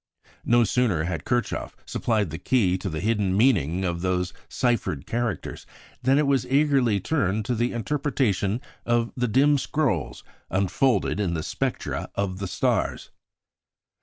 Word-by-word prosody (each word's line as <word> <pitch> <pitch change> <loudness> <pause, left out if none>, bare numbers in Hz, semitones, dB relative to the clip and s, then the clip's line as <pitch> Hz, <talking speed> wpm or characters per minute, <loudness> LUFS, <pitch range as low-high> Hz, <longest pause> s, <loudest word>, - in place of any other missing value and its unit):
No 120 0 +5
sooner 110 -8 +1
had 85 -2 -3
Kirchhoff 120 -2 -1
supplied 105 -7 0
the 80 - -5
key 95 -3 +2
to 95 +1 -3
the 80 -1 -4
hidden 100 -3 +1
meaning 95 - +2
of 85 -1 -2
those 90 -1 -1 0.2
ciphered 120 - 0
characters 120 -3 -3 0.3
than 130 +2 +3
it 150 - +3
was 140 -1 +2
eagerly 135 -6 +3
turned 110 - 0
to 125 - 0
the 120 +1 0
interpretation 120 -5 0 0.2
of 120 0 +1
the 125 -1 0
dim 140 +5 +4
scrolls 120 - -1 0.3
unfolded 100 +3 +1
in 90 -5 0
the 80 - -2
spectra - - -3
of 95 -2 -2
the 100 - -3
stars. - - -1
110 Hz, 145 wpm, -25 LUFS, 95-125 Hz, 0.3 s, No